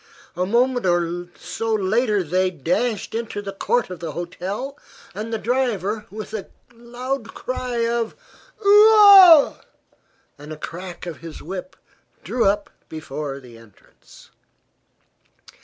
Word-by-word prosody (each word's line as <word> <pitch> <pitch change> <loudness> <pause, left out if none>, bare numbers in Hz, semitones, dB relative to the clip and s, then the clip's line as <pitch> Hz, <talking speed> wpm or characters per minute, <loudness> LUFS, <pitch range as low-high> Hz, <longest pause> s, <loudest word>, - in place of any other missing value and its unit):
A 180 +1 -1
moment 245 +3 +1 0.8
later 215 -1 +1
they 185 +3 +1
dashed 185 - -2
into 225 -2 -4
the 200 -1 -6
court 215 +1 -1
of 180 - -7
the 160 -2 -6
hotel 190 - -5 0.4
and 215 +3 -6
the 225 - -1
driver 220 -3 -1
with 215 +1 -8
a 215 -3 -5 0.3
loud 240 +1 -6
cry 250 -2 -3
of 235 -1 -2 0.5
"Oo 415 +2 +8
ah!" 385 -7 +8 0.8
and 150 +1 -10
a 155 - -7
crack 175 +3 -8
of 170 -2 -6
his 165 -2 -10
whip 190 - -7 0.5
drew 245 - 0
up 200 +1 0 0.2
before 145 -2 -6
the 120 -3 -15
entrance. 115 -3 -20
215 Hz, 125 wpm, -22 LUFS, 180-245 Hz, 0.8 s, Oo